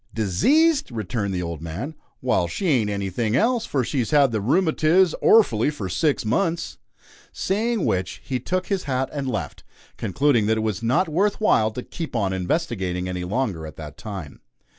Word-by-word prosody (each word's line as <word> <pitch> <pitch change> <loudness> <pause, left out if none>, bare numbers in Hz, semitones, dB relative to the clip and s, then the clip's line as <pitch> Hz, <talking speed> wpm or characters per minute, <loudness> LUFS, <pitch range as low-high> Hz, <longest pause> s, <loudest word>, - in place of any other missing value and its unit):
"Diseased!" 270 - +3
returned 110 -2 -3
the 90 -1 -2
old 85 -3 -5
man; 90 - -5 0.3
"Wal, 105 -8 +2
she 190 - -4
ain't 120 -8 +2
anything 100 +3 -1
else, 235 - +2
for 135 -3 0
she's 120 -2 -1
had 140 -4 +4
the 110 -2 -1
rumatiz 160 - +3
orfully 145 - +5
for 105 -11 -5
six 135 - 0
months!" 165 - -1 0.5
Saying 220 +1 -1
which, 95 0 -1
he 130 -2 -2
took 185 +8 -2
his 195 -2 -2
hat 130 -1 -1
and 140 -2 -3
left, - - -4 0.3
concluding 120 0 +2
that 110 0 +2
it - - 0
was 110 -1 -2
not 125 +10 +2
worth 195 +6 +1
while 115 - +3
to 125 +3 -6
"keep 165 -6 -6
on 100 -4 0
investigating" 95 - -2
any 90 -1 -3
longer 95 -5 -2
at 75 - -10
that 75 -2 -8
time. 95 -9 -8
120 Hz, 175 wpm, -23 LUFS, 95-160 Hz, 0.5 s, orfully